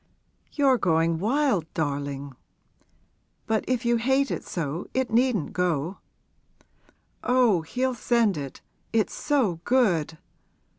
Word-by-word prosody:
'You're 270 -4 +3
going 165 -2 +2
wild, 225 - +1
darling; 140 -2 -3 1.1
but 220 -1 0
if 250 -1 -1
you 235 0 +3
hate 265 +4 +1
it - - -3
so 165 0 -4
it 260 -2 0
needn't 235 - +1
go.' 175 0 -1 1.2
'Oh, 245 -8 +3
he'll 255 +11 -1
send 235 -4 +2
it 140 -3 -7 0.3
it's 220 -4 +1
so 240 - 0
good! 175 - +2
210 Hz, 110 wpm, -26 LUFS, 160-250 Hz, 1.2 s, You're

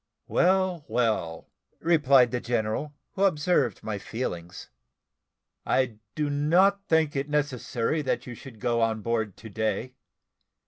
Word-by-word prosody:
"Well, 185 -2 +2
well," 110 -8 -1 0.3
replied 140 -7 +4
the 125 - -1
general, 120 +5 -2 0.2
who 195 - -2
observed 150 - +1
my 105 -2 -3
feelings, 90 -7 -6 0.9
"I 125 -5 0 0.2
do 150 -1 0
not 175 +8 +3
think 160 -2 +2
it 135 +1 -1
is - - -11
necessary 145 -1 -1
that 140 - -2
you 125 - -7
should 120 -1 -12
go 120 -1 0
on 110 -2 0
board 110 -4 -1
to 115 - -10
day. 110 +4 -2
130 Hz, 135 wpm, -27 LUFS, 110-150 Hz, 0.9 s, replied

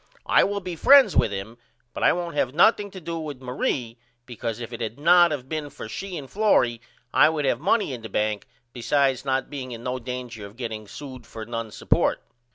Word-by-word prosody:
I - - +5
will 200 0 -1
be 180 -2 -5
friends 275 - +6
with - - +4
him 100 +4 -6 0.3
but - - -6
I - - +5
won't 175 -1 -3
have 135 -2 -1
nothing 205 +3 +4
to 190 - -9
do 170 -1 -5
with 150 -4 -6
Marie 125 -2 -2 0.3
because 120 -2 -5
if 120 0 -7
it 115 - -6
had 115 +3 -4
not 175 +2 +6
of 135 -4 -4
been 155 0 -4
for 140 -5 -9
she 185 - -6
and 140 -3 -7
Florrie 125 - +2 0.3
I 150 - +6
would 155 -2 -1
have 125 -3 +1
money 190 - +1
in 120 - -6
the 110 - -8
bank 105 0 -1 0.3
besides 135 +1 +1
not 135 -1 -1
being 130 -3 -6
in 115 0 -8
no 125 +1 -2
danger 125 -3 -6
of 100 +3 -17
getting 110 -4 -5
sewed 130 -1 -10
for 110 -1 -8
none 115 -1 -4
support. - - +1
130 Hz, 215 wpm, -24 LUFS, 115-160 Hz, 0.3 s, friends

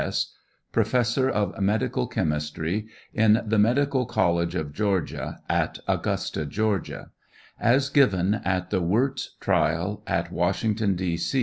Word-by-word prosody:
C. - - +1
S., - - -1 0.4
Professor 120 +3 +2
of 100 -5 -1
Medical 100 - 0
Chemistry 80 +7 -2 0.3
in 110 0 +4
the 110 0 +1
Medical 130 +3 +2
College 85 0 +1
of 75 -2 -3
Georgia, 100 -1 -2
at - - 0
Augusta, - - -1
Ga., 105 +4 -1 0.6
as 135 +4 +3
given 100 -9 +3
at 90 -1 -1
the 95 - +1
Wirtz 125 +9 0
trial 90 +6 0
at - - -1
Washington, 100 +3 0
D. 90 -2 -2
105 Hz, 125 wpm, -25 LUFS, 90-115 Hz, 0.6 s, in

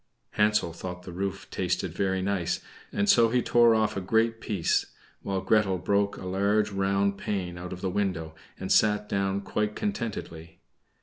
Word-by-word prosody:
Hansel 105 -5 +2
thought 90 +1 -7
the 90 - -8
roof 100 +2 -4
tasted 90 -1 -1
very 95 0 0
nice, 95 -3 0 0.3
and 100 - 0
so 115 +2 +6
he 125 +1 +1
tore 120 -1 +5
off 110 -1 +1
a 95 - -2
great 115 +4 +1
piece; 100 -7 0 0.3
while 95 -1 -2
Gretel 105 -3 +2
broke 100 +3 0
a - - -8
large 100 +3 +1
round 100 0 +1
pane 90 -4 -3
out 90 +1 -7
of 90 0 -7
the 95 - -1
window 90 -5 -2 0.3
and 95 - -4
sat 105 -1 +3
down 100 0 0
quite 105 +2 -2
contentedly. 100 - -4
100 Hz, 170 wpm, -27 LUFS, 90-105 Hz, 0.3 s, so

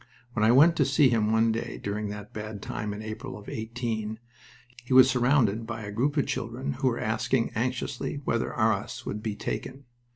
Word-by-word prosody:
When 110 - 0
I 110 - +6
went 155 +7 +6
to 145 - +5
see 135 0 +4
him 110 -2 +2
one 110 0 +3
day 115 +1 -3
during 105 +1 -3
that 105 0 -8
bad 105 -1 -6
time 105 -1 -4
in 105 +1 -6
April 110 +4 -6
of 105 - -13
'18, 110 -1 -3 0.7
he 125 - -2
was 130 0 +9
surrounded 120 -4 +2
by 115 -1 -5
a 100 - -6
group 135 +8 0
of 145 - +3
children 130 +5 -3
who 130 +1 -1
were 120 -2 0
asking 115 +2 0
anxiously 125 +3 -2
whether 115 - 0
Arras 110 -2 0
would 105 - -4
be 110 -2 -3
taken. 135 +6 -5
115 Hz, 195 wpm, -27 LUFS, 110-130 Hz, 0.7 s, was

